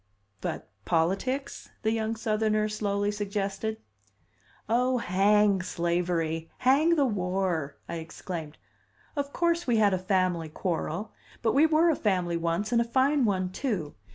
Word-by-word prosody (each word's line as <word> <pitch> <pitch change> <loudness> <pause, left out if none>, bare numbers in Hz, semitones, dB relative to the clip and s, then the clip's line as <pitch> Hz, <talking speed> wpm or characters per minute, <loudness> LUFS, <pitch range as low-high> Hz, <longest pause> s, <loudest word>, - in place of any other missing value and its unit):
"But - - -4 0.2
politics?" 195 +12 -1
the 220 - +2
young 225 0 -1
Southerner 215 -1 +1
slowly 205 -1 -1
suggested. 205 +1 -3 0.9
"Oh, 250 +3 +2
hang 200 -1 +3
slavery! 170 -2 -1
Hang 290 +7 +4
the 285 -3 +3
war!" 180 - -1
I 170 - -4
exclaimed. 160 -1 -7 0.6
"Of 285 -1 -2
course, 340 0 0
we 240 -2 +3
had 205 -2 +4
a 185 - +1
family 185 -4 0
quarrel. 175 +4 -3 0.3
But 225 - +2
we 295 +4 +5
were 320 +2 +4
a - - +1
family 180 -7 0
once, 170 +6 -1
and 235 -1 +4
a - - +3
fine 260 +3 +2
one, 185 -3 0
too! 185 - -2
205 Hz, 140 wpm, -28 LUFS, 180-235 Hz, 0.9 s, we